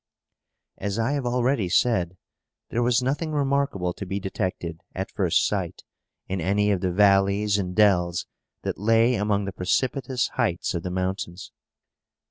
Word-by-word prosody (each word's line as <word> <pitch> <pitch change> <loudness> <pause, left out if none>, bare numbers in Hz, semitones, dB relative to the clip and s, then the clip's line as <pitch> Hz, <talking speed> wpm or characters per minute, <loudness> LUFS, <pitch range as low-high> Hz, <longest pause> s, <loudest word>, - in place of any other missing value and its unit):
As 100 +1 -2
I 115 +4 +1
have 140 -4 -1
already 120 -5 +1
said, 90 -2 +2 0.5
there 120 - 0
was 120 +1 +2
nothing 150 +5 -1
remarkable 140 -11 0
to - - -7
be 95 +1 -3
detected, 90 -4 -4
at - - -4
first - - +2
sight, - - -2 0.4
in 95 -1 -2
any 105 +4 +2
of 95 -3 0
the 90 - 0
valleys 100 +1 +3
and 90 -2 -3
dells 90 -5 +3 0.4
that - - -3
lay 115 +3 +4
among 105 -2 0
the 100 - -3
precipitous 125 +6 0
heights 105 -9 -1
of 85 - -2
the 90 - -4
mountains. 95 0 -3
100 Hz, 150 wpm, -25 LUFS, 90-120 Hz, 0.5 s, lay